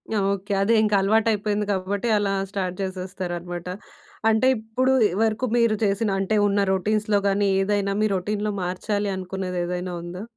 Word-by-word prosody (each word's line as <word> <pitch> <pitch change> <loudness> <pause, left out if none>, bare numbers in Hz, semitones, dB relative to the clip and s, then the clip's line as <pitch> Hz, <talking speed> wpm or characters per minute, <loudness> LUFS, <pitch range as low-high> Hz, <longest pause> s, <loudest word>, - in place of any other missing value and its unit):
Okay. 200 0 -1
అదే 220 +4 +3
ఇంకా 210 -1 +2
అలవాటైపోయింది 210 0 +1
కాబట్టి, 200 +4 -2
అలా 200 -1 0 0.2
స్టార్ట్ 185 -3 -2
చేసేస్తారనమాట. 180 -2 -5 0.6
అంటే 225 +4 +3
ఇప్పుడు 225 +4 0 0.3
వరకు 220 +3 0
మీరు 230 -2 +3
చేసిన 200 +2 +1
అంటే, 210 +2 +1
ఉన్న 200 0 +1
రొటీన్స్‌లో 210 +2 +1
కానీ, 200 0 +2
ఏదైనా 200 0 0
మీ - - +4
రొటీన్‌లో 210 +3 -2
మార్చాలి 205 +3 -2
అనుకున్నది 185 -1 -4
ఏదైనా 180 0 -3
ఉందా? 180 +3 -7
200 Hz, 140 wpm, -24 LUFS, 185-215 Hz, 0.6 s, మీ